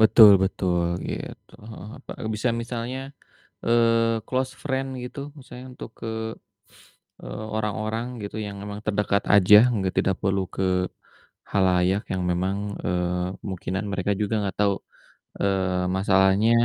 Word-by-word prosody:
Betul 110 Hz, -1 st, +9 dB
betul, 90 Hz, -2 st, 0 dB, 0.2 s
gitu, -, -, -7 dB
heeh 110 Hz, 0 st, -10 dB, 0.3 s
heeh, 125 Hz, -, -6 dB
bisa 110 Hz, +4 st, 0 dB
misalnya, 120 Hz, +2 st, -4 dB, 0.7 s
eee, 115 Hz, -1 st, +3 dB
closed 130 Hz, 0 st, -1 dB
friend 135 Hz, -1 st, -1 dB
gitu 125 Hz, -, -7 dB, 0.2 s
misalnya 125 Hz, -1 st, -11 dB
untuk 120 Hz, -, -9 dB
ke, -, -, -6 dB, 1.2 s
eee, -, -, -6 dB
orang-orang 110 Hz, +2 st, -2 dB, 0.2 s
gitu 100 Hz, +1 st, -6 dB
yang 100 Hz, -1 st, -7 dB
memang 105 Hz, 0 st, -6 dB
terdekat 100 Hz, -1 st, +1 dB
aja, 100 Hz, +1 st, +8 dB, 0.2 s
nggak 95 Hz, -2 st, -1 dB
tidak 95 Hz, -1 st, +2 dB
perlu 95 Hz, 0 st, +1 dB
ke -, -, -1 dB, 0.9 s
khalayak 95 Hz, +1 st, +2 dB
yang 95 Hz, -, -1 dB
memang, 95 Hz, +3 st, 0 dB, 0.3 s
eee, 90 Hz, 0 st, -1 dB
kemungkinan 95 Hz, +1 st, -4 dB
mereka 100 Hz, +1 st, 0 dB
juga 105 Hz, +1 st, 0 dB
gak 95 Hz, -, -4 dB
tau, 100 Hz, -1 st, +3 dB, 0.7 s
eee, 95 Hz, -2 st, +1 dB
masalahnya, 95 Hz, +3 st, +4 dB
100 Hz, 130 wpm, -25 LUFS, 95-115 Hz, 1.2 s, Betul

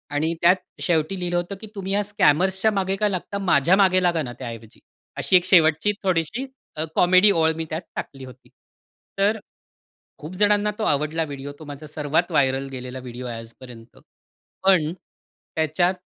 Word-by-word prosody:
आणि 160 Hz, +3 st, 0 dB
त्यात 175 Hz, +2 st, +6 dB, 0.3 s
शेवटी 170 Hz, +2 st, 0 dB
लिहिलं 175 Hz, -1 st, -1 dB
होतं 175 Hz, +3 st, -3 dB
की 220 Hz, -, -8 dB
तुम्ही 195 Hz, -1 st, -4 dB
ह्या 205 Hz, +1 st, +2 dB
स्कॅमर्सच्या 190 Hz, +1 st, +2 dB
मागे 195 Hz, -1 st, -1 dB
का 210 Hz, +1 st, +1 dB
लागता? 195 Hz, +1 st, -4 dB
माझ्या 160 Hz, +7 st, +5 dB
मागे 185 Hz, -2 st, +4 dB
लागा 170 Hz, -2 st, +2 dB
ना 120 Hz, -3 st, -6 dB
त्या 130 Hz, -, -6 dB
ऐवजी. 115 Hz, -1 st, -11 dB, 0.4 s
अशी -, -, +2 dB
एक 180 Hz, -, -1 dB
शेवटची 165 Hz, +1 st, +4 dB
थोडीशी 185 Hz, -, 0 dB, 0.3 s
अ, 155 Hz, -, -1 dB
कॉमेडी 185 Hz, +3 st, +5 dB
ओळ 160 Hz, -3 st, +3 dB
मी 165 Hz, 0 st, -4 dB
त्यात 160 Hz, +1 st, -3 dB
टाकली 135 Hz, -1 st, -6 dB
होती. 130 Hz, 0 st, -15 dB, 0.7 s
तर 205 Hz, +3 st, +3 dB, 0.8 s
खूप 155 Hz, +4 st, -8 dB
जणांना 210 Hz, 0 st, +3 dB
तो -, -, -1 dB
आवडला 155 Hz, 0 st, 0 dB
व्हिडिओ 140 Hz, -1 st, -7 dB
तो 155 Hz, -, -10 dB
माझा 145 Hz, +1 st, -9 dB
सर्वात 155 Hz, +4 st, -1 dB
व्हायरल 135 Hz, -3 st, +1 dB
गेलेला 130 Hz, -1 st, -7 dB
व्हिडिओ 125 Hz, 0 st, -8 dB
आहे 120 Hz, -1 st, -5 dB
आजपर्यंत. 115 Hz, 0 st, -13 dB, 0.7 s
पण, 180 Hz, -5 st, +4 dB, 0.6 s
त्याच्यात 160 Hz, +3 st, +1 dB
165 Hz, 170 wpm, -23 LUFS, 145-190 Hz, 0.8 s, त्यात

